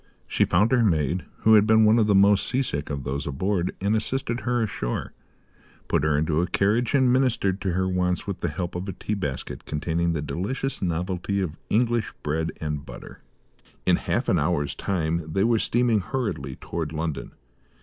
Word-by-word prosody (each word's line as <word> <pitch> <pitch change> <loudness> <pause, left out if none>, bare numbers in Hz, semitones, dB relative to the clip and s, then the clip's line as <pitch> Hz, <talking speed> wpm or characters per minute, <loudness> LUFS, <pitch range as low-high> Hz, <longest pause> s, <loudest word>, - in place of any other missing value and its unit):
She - - +2
found 105 +7 +3
her 125 -2 +4
maid 85 - +1 0.2
who 110 - +5
had 105 -1 +6
been 110 0 +6
one 110 +2 +5
of 110 - +3
the 105 - +4
most 100 0 +5
sea 130 +2 +1
sick 75 - -4
of 70 -2 -3
those 70 +2 -3
aboard 90 +6 -1
and 100 +3 +1
assisted 120 +2 -1
her 120 -2 0
ashore, - - -3 0.7
put - - +1
her 75 -1 +2
into 80 +1 +1
a 90 - 0
carriage 110 +9 +1
and 130 -3 +4
ministered 115 -7 +1
to 95 -3 -1
her 95 +1 +1
wants 90 -1 0
with 100 -2 -4
the 85 - -1
help 85 +3 -4
of 90 +3 -4
a - - -3
tea 95 +4 -4
basket 75 -11 -4
containing 85 +2 -1
the 75 - -2
delicious 125 - -3
novelty 90 +2 -1
of 85 -5 -2
English 120 0 +1
bread 80 +2 -1
and 75 -2 -3
butter. - - -11 0.6
In - - +4
half - - -1
an - - +3
hour's 75 -1 0
time 85 -3 -1
they 95 - +2
were 115 0 +3
steaming 120 -1 +2
hurriedly 90 - -3
towards 80 0 -5
London. 80 -1 -4
95 Hz, 190 wpm, -25 LUFS, 80-110 Hz, 0.7 s, had